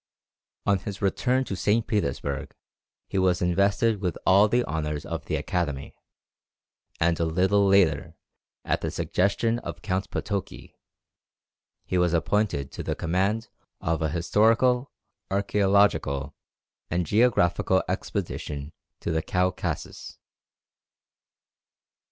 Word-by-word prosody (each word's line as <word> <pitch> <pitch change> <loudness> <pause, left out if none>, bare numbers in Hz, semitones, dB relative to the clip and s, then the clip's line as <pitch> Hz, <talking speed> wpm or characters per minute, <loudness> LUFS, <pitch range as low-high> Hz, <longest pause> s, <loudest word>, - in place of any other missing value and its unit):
On 100 -1 +3
his 100 0 -6
return 125 +6 +1
to 100 - -4
St. 105 +5 +1
Petersburg 100 - -2 0.5
he 95 - -1
was 90 -1 +2
invested 100 +5 +2
with 90 -4 -1
all 100 +3 +6
the 120 +3 +1
honours 75 -1 -3
of - - -5
the - - -1
Academy; 75 -6 -2 1.1
and 85 0 +2
a - - +2
little 95 +5 +2
later, 85 -5 +3 0.5
at - - 0
the - - -2
suggestion 115 +5 0
of - - -8
Count 95 +1 -2
Potoki, 100 -3 -4 1.1
he 90 - 0
was 90 -1 +2
appointed 85 -4 0
to - - -6
the - - -2
command 95 +6 0 0.3
of 80 0 -1
an 80 -2 0
historical, 115 - +2 0.4
archæological, 100 -8 +2 0.6
and 85 +1 0
geographical 95 -3 +3
expedition 75 +1 -4 0.3
to - - -2
the 80 0 +1
Caucasus. 90 +2 -2
95 Hz, 115 wpm, -26 LUFS, 85-105 Hz, 1.1 s, all